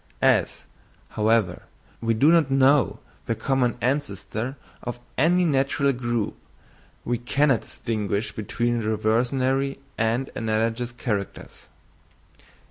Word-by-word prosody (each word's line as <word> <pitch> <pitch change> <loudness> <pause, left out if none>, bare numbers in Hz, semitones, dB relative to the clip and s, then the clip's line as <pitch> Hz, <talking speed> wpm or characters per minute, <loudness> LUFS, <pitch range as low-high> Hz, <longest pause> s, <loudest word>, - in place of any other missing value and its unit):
As, - - +3 0.5
however, 110 -4 +1 0.4
we 115 0 +1
do 145 +8 +5
not 165 -5 +4
know 135 +1 +4 0.3
the - - 0
common 130 -3 0
ancestor 130 -1 -2 0.2
of 120 0 -5 0.2
any 175 +5 +3
natural 140 -1 +2
group, 120 -3 -2 0.7
we 120 -1 -1
cannot 135 +1 +2
distinguish 105 -2 -3
between 120 +2 -1
reversionary 125 +5 +1 0.2
and 115 +4 0
analogous 115 +2 -1
characters. 110 -5 -5
120 Hz, 100 wpm, -24 LUFS, 110-135 Hz, 0.7 s, do